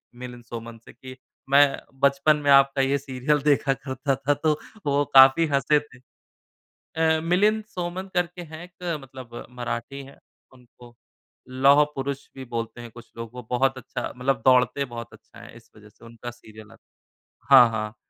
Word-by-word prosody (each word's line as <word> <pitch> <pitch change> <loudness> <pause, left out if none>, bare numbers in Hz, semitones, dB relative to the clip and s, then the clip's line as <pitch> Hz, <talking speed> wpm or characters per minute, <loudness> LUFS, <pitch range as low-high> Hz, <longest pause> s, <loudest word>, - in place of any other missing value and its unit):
मिलिंद 125 -1 -10
सोमन 115 0 -9
से - - -14
कि 130 0 -12 0.3
मैं 140 0 +5 0.2
बचपन 140 +2 +3
में 145 - 0
आपका 135 0 +5
ये 135 +1 +1
सीरियल 140 +2 -1
देखा 140 -1 +2
करता 135 0 -3
था 135 +2 0
तो 150 +1 0 0.3
वो 145 0 +2
काफ़ी 135 +4 +7
हँसे 145 +1 +2
थे। 145 -4 -17 1.0
अ, 160 0 +2
मिलिंद 205 +6 +2
सोमन 180 -1 -6
करके 180 0 -2
हैं 160 0 -10
एक 175 -2 -5
मतलब 130 -3 -11
मराठी 125 +2 -6
हैं 140 - -16 0.4
उनको 120 -1 -18 0.5
लौह 135 +3 +5
पुरुष 135 0 -4
भी 135 -1 -8
बोलते 115 0 -5
हैं 120 -1 -10
कुछ 120 +1 -15
लोग। 115 -1 -7
वो 125 0 -9
बहुत 135 +1 +1
अच्छा 130 - -6
मतलब 125 -1 -1
दौड़ते 125 +1 +3
बहुत 120 -2 -9
अच्छा - - -17
है - - -13
इस - - -20
वज़ह 105 0 -16
से 110 - -20
उनका 115 +1 -9
सीरियल 110 -2 -15
आता - - -20 0.4
है। 135 +3 +2
हाँ, 120 - +6
हाँ। 110 0 -4
135 Hz, 170 wpm, -24 LUFS, 120-145 Hz, 1.0 s, काफ़ी